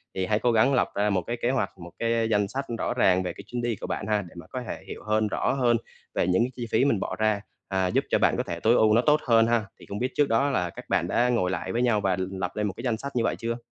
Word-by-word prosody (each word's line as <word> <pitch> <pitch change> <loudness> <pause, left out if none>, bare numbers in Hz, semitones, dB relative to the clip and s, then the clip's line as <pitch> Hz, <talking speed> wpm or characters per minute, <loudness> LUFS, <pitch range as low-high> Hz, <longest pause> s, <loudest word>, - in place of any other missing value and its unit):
Thì 95 - 0
hãy 105 +2 +1
cố 120 +2 +2
gắng 115 +5 +4
lập 125 - +2
ra 105 +1 +2
một 95 -3 +1
cái 120 +7 -4
kế 120 - +1
hoạch, 120 -6 -1
một 85 0 -10
cái 115 -1 +1
danh 105 -2 +2
sách 135 +6 -4
rõ - - -1
ràng 95 -6 +3
về 90 - -3
cái 100 - -11
chuyến 120 +1 -4
đi 120 -1 -1
của - - -7
bạn - - -3
ha, 105 -1 +1
để - - -15
mà 85 - -10
có 130 - -5
thể - - -6
hiểu - - -8
hơn, 110 0 +1
rõ - - 0
hơn 120 -3 +3 0.4
về - - +1
những 95 +5 +3
cái 125 - -2
chi 120 -2 -5
phí 125 - +3
mình 115 -8 +2
bỏ - - -3
ra, 110 -2 +2 0.3
à, 95 -1 0
giúp - - +1
cho - - +2
bạn - - +3
có - - 0
thể 85 - -5
tối 110 +6 +4
ưu 110 -2 +4
nó 115 - +5
tốt 150 +3 +4
hơn 115 -1 +5
ha. 115 -2 +1
Thì - - -13
không 100 +2 -6
biết 125 +1 -1
trước 145 -1 +2
đó 135 +5 +2
là 90 -10 0
các - - -10
bạn - - +1
đã 125 +1 +2
ngồi 105 -7 +1
lại - - -3
với 120 - 0
nhau 115 -4 +2
và 95 -2 +1 0.2
lập 95 -2 -3
lên 105 -1 0
một 95 - -3
cái 115 - -7
danh 120 -4 0
sách 140 +3 -7
như 120 - +2
vậy - - 0
chưa? 115 0 -3
110 Hz, 325 wpm, -26 LUFS, 100-120 Hz, 0.4 s, nó